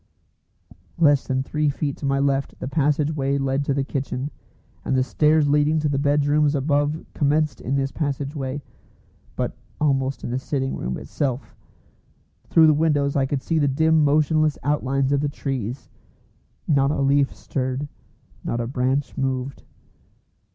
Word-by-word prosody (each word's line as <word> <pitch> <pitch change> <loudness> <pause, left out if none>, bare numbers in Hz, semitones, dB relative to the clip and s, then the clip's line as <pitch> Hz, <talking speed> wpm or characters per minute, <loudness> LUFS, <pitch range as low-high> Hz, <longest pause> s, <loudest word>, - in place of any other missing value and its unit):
Less 145 -5 +4
than 130 0 0
three 150 +1 0
feet 145 0 -2
to 140 - -3
my 135 0 +1
left 140 -1 0
the - - -4
passage 150 +1 +1
way 140 -1 0
led 135 0 0
to - - 0
the 140 - +1
kitchen, 135 0 -3 0.5
and 135 - 0
the 130 - +3
stairs 150 +2 +3
leading 150 +2 +3
to 155 -1 +1
the 140 -1 0
bedrooms 145 +1 +2
above 145 +2 0
commenced 150 -1 +1
in 135 - -1
this 135 0 0
passage 145 -1 -3
way, 135 0 -4 0.7
but - - -2 0.2
almost 135 -2 0
in - - -4
the 125 - -1
sitting 135 0 -2
room 65 +1 -3
itself. 120 - -3 0.9
Through 160 - +5
the 155 - +6
windows 145 -2 +1
I 135 -2 +2
could 140 -1 -2
see 165 -1 0
the 145 - +2
dim 160 +3 +3
motionless 155 +1 +2
outlines 135 -1 0
of 140 -1 +2
the 145 - 0
trees: 130 -3 -4 0.8
not 140 -3 +3
a 145 - -1
leaf 140 0 +2
stirred, 130 +1 -3 0.6
not 120 - -2
a 120 - -1
branch 130 +2 -1
moved. 135 0 -2
140 Hz, 160 wpm, -23 LUFS, 135-150 Hz, 0.9 s, the